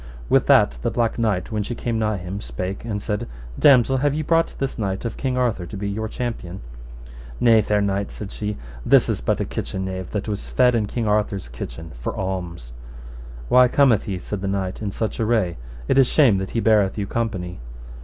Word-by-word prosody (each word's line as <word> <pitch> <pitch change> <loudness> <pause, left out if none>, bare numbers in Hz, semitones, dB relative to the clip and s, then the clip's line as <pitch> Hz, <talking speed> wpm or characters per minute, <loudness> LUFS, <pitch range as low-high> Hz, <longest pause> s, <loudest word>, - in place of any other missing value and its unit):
With - - +3
that 65 -2 +5
the - - 0
Black 115 -1 0
Knight, 105 -5 0
when 105 -1 -1
she 120 +4 -4
came 115 -1 -2
nigh 110 -1 0
him, 95 +3 -5
spake 90 +11 -5
and 110 -3 -3
said, 105 0 -3 0.3
Damosel, 135 -2 +6
have 145 +2 +1
ye 155 - -1
brought 165 +2 +2
this 135 -3 -3
knight 95 0 -2
of 115 - -3
King 130 -2 -2
Arthur 115 -8 0
to 100 - -7
be 100 +1 -3
your 110 +2 -2
champion? 110 -6 -5 0.8
Nay, 115 -2 +6
fair 105 0 +1
knight, 100 0 0
said 105 -1 -8
she, 105 -1 -4 0.3
this - - +5
is - - -1
but - - 0
a - - 0
kitchen 95 0 -4
knave 95 -1 -5
that 105 0 -3
was 105 -2 -4
fed 125 -1 +4
in 110 -3 +1
King 115 +1 -2
Arthur's 105 -5 0
kitchen 80 +6 -7
for - - -4
alms. 90 -9 -4 0.7
Why 125 - +6
cometh 125 -5 +3
he, 100 -4 -3
said 95 +2 -5
the 100 - -2
knight, 95 0 -2
in 105 - -2
such 110 +1 -3
array? 110 -6 +1 0.3
it 135 - +4
is 130 - +6
shame 125 -11 +4
that 95 - -4
he - - +2
beareth 105 -3 +3
you 100 - -1
company. 95 - -3
105 Hz, 210 wpm, -22 LUFS, 95-115 Hz, 0.8 s, Damosel